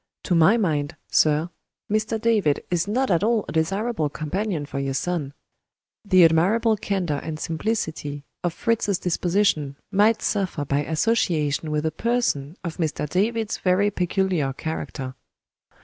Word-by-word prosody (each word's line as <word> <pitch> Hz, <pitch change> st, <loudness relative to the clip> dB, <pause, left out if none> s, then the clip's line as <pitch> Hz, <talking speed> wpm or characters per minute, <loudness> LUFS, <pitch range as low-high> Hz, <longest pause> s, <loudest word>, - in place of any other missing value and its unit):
"To -, -, 0 dB
my 175 Hz, +7 st, +5 dB
mind, 155 Hz, -8 st, 0 dB, 0.2 s
sir, 155 Hz, +3 st, +3 dB, 0.4 s
Mr. 215 Hz, +1 st, 0 dB
David 215 Hz, -10 st, +2 dB
is 175 Hz, +1 st, +1 dB
not 245 Hz, +2 st, 0 dB
at 170 Hz, +1 st, +2 dB
all 225 Hz, -1 st, +2 dB
a -, -, -5 dB
desirable 195 Hz, +2 st, 0 dB
companion 160 Hz, +2 st, -3 dB
for 140 Hz, -1 st, -5 dB
your 135 Hz, -1 st, -2 dB
son. 165 Hz, -4 st, -2 dB, 0.7 s
The 185 Hz, -4 st, +6 dB
admirable 200 Hz, +8 st, +3 dB
candor 185 Hz, -8 st, -1 dB
and 155 Hz, -1 st, -5 dB
simplicity 160 Hz, -6 st, -3 dB, 0.2 s
of 175 Hz, -, +1 dB
Fritz's 210 Hz, +1 st, 0 dB
disposition 175 Hz, -5 st, +1 dB, 0.2 s
might 215 Hz, +3 st, +3 dB
suffer 185 Hz, -7 st, -1 dB
by 140 Hz, +1 st, 0 dB
association 160 Hz, -5 st, +1 dB
with 150 Hz, 0 st, -1 dB
a 160 Hz, -, +1 dB
person 180 Hz, -, -1 dB
of 170 Hz, -2 st, -5 dB
Mr. 155 Hz, -3 st, -1 dB
David's 215 Hz, +6 st, 0 dB
very 195 Hz, +3 st, +2 dB
peculiar 180 Hz, -6 st, 0 dB
character." 135 Hz, -3 st, -5 dB
175 Hz, 140 wpm, -24 LUFS, 155-210 Hz, 0.7 s, The